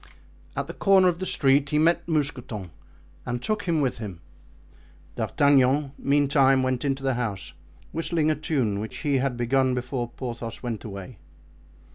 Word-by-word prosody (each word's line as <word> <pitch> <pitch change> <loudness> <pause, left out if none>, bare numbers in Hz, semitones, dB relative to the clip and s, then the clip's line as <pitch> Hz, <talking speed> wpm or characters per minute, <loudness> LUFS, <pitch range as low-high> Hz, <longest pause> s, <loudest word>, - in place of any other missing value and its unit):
At - - -2
the - - -7
corner 190 -2 +5
of 175 -1 -3
the 185 - -3
street 140 -1 +3
he 150 - +1
met 165 +3 +2
Mousqueton 125 - -2 0.5
and 120 0 -3
took 215 - -2
him 165 -4 +1
with 130 -4 -1
him. 100 -7 -6 1.0
D'Artagnan, 140 0 +3
meantime, 140 -2 +3
went 130 -1 -1
into 135 -1 -1
the 135 -1 +1
house, 115 -6 -3 0.4
whistling 160 -1 0
a - - +1
tune 130 -9 -1
which 110 +1 -6
he 140 -2 +2
had 130 -2 -1
begun 130 +2 +2
before 125 -1 -3
Porthos 120 -2 -6
went 115 -4 -4
away. 100 0 -8
135 Hz, 155 wpm, -25 LUFS, 120-150 Hz, 1.0 s, corner